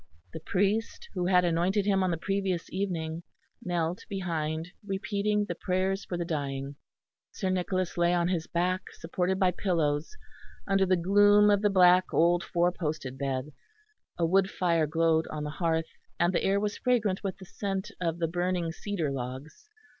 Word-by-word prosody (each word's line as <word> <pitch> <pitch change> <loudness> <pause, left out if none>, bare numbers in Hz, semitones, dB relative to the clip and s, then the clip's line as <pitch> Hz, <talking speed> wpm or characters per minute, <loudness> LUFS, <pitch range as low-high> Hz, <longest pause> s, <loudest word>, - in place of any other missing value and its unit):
The - - -5
priest, 200 +7 -1
who 180 -2 -1
had 180 -1 +4
anointed 175 +4 +1
him 195 -2 +2
on 185 - +1
the 170 - -1
previous 195 -1 -2
evening, 170 -4 -2 0.4
knelt 175 +1 -2
behind, 165 -4 -3
repeating 205 +1 -1
the 175 - -3
prayers 190 +2 -1
for 175 - -4
the 170 - -2
dying. 140 -3 -3 0.6
Sir 190 -2 -2
Nicholas 185 -1 -1
lay 175 0 +4
on 175 -1 +2
his 175 -3 -1
back, 180 +2 0
supported 180 +3 -1
by 185 -1 +3
pillows, 160 -5 -1 0.5
under 195 -1 +3
the 185 0 +3
gloom 205 +3 +5
of 200 -1 +3
the 210 - +3
black 185 -1 +6
old 175 +2 +3
four 175 0 +1
posted 150 -7 -4
bed. 135 +1 -2 0.7
A 170 - +2
wood 190 +3 +3
fire 170 -5 +1
glowed 160 +1 +2
on 150 -1 -5
the 150 - -4
hearth, 160 0 -1 0.3
and 175 +1 +3
the - - +1
air 195 +1 +2
was 205 0 -2
fragrant 215 -7 +1
with 195 -2 -3
the 190 - -11
scent 195 +1 -4
of 165 -2 -1
the 170 -1 0
burning 175 0 -1
cedar 170 -4 -3
logs. 130 - -7
180 Hz, 170 wpm, -29 LUFS, 165-195 Hz, 0.7 s, black